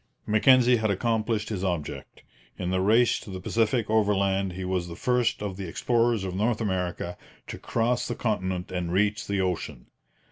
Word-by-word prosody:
Mackenzie 125 Hz, +3 st, +5 dB
had 110 Hz, -1 st, 0 dB
accomplished 110 Hz, +1 st, 0 dB
his 100 Hz, -4 st, -3 dB
object. 75 Hz, -7 st, -4 dB, 0.3 s
In 90 Hz, 0 st, -3 dB
the 95 Hz, 0 st, +1 dB
race 110 Hz, +5 st, +3 dB
to -, -, -11 dB
the 95 Hz, -1 st, -6 dB
Pacific 115 Hz, +3 st, 0 dB
overland 100 Hz, -3 st, +1 dB
he 95 Hz, +1 st, -5 dB
was 90 Hz, -1 st, -1 dB
the 85 Hz, -, -7 dB
first 125 Hz, -2 st, 0 dB
of 95 Hz, -3 st, -4 dB
the 95 Hz, -2 st, -5 dB
explorers 115 Hz, +3 st, +1 dB
of 95 Hz, -2 st, -4 dB
North 110 Hz, +4 st, 0 dB
America 90 Hz, -4 st, -3 dB, 0.3 s
to -, -, -8 dB
cross 120 Hz, +1 st, 0 dB
the 120 Hz, -, -3 dB
continent 95 Hz, -5 st, -2 dB
and 90 Hz, -2 st, -3 dB
reach 105 Hz, +3 st, +1 dB
the 100 Hz, -1 st, 0 dB
ocean. 85 Hz, -8 st, -3 dB
100 Hz, 175 wpm, -26 LUFS, 90-115 Hz, 0.3 s, Mackenzie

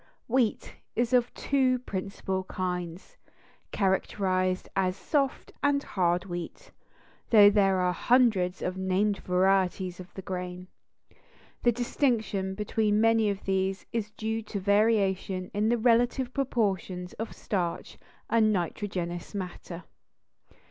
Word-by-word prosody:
Wheat 240 Hz, -2 st, 0 dB, 0.2 s
is 240 Hz, +2 st, 0 dB
of 245 Hz, -1 st, +3 dB
two 260 Hz, -2 st, +2 dB
principal 190 Hz, -4 st, -4 dB
kinds, 180 Hz, -2 st, -5 dB, 0.5 s
characterized 185 Hz, -1 st, 0 dB
as 185 Hz, -1 st, +1 dB
soft 275 Hz, +6 st, -1 dB
and 285 Hz, 0 st, +2 dB
hard 175 Hz, -1 st, 0 dB
wheat, 175 Hz, -2 st, -7 dB, 0.6 s
though 205 Hz, -3 st, +8 dB
there 195 Hz, -2 st, +3 dB
are 180 Hz, 0 st, +1 dB
hundreds 220 Hz, -7 st, +2 dB
of 185 Hz, +1 st, -2 dB
named 195 Hz, +2 st, +1 dB
varieties 185 Hz, 0 st, +1 dB
of 185 Hz, 0 st, -10 dB
the 190 Hz, -, -7 dB
grain. 180 Hz, 0 st, -5 dB, 0.9 s
The 240 Hz, -, +4 dB
distinction 225 Hz, -5 st, -1 dB
between 210 Hz, 0 st, +1 dB
many 225 Hz, -1 st, +4 dB
of 200 Hz, -1 st, -3 dB
these 190 Hz, 0 st, -1 dB
is 220 Hz, -3 st, -2 dB
due 220 Hz, +1 st, -3 dB
to 210 Hz, -1 st, -5 dB
variation 195 Hz, -2 st, +1 dB
in 210 Hz, +2 st, +1 dB
the 240 Hz, -, +3 dB
relative 245 Hz, +2 st, +2 dB
proportions 195 Hz, -9 st, -1 dB
of 225 Hz, -, -5 dB
starch 175 Hz, -4 st, -3 dB, 0.3 s
and 220 Hz, -2 st, +3 dB
nitrogenous 175 Hz, -1 st, -3 dB
matter. 180 Hz, -2 st, -6 dB
195 Hz, 120 wpm, -28 LUFS, 185-225 Hz, 0.9 s, though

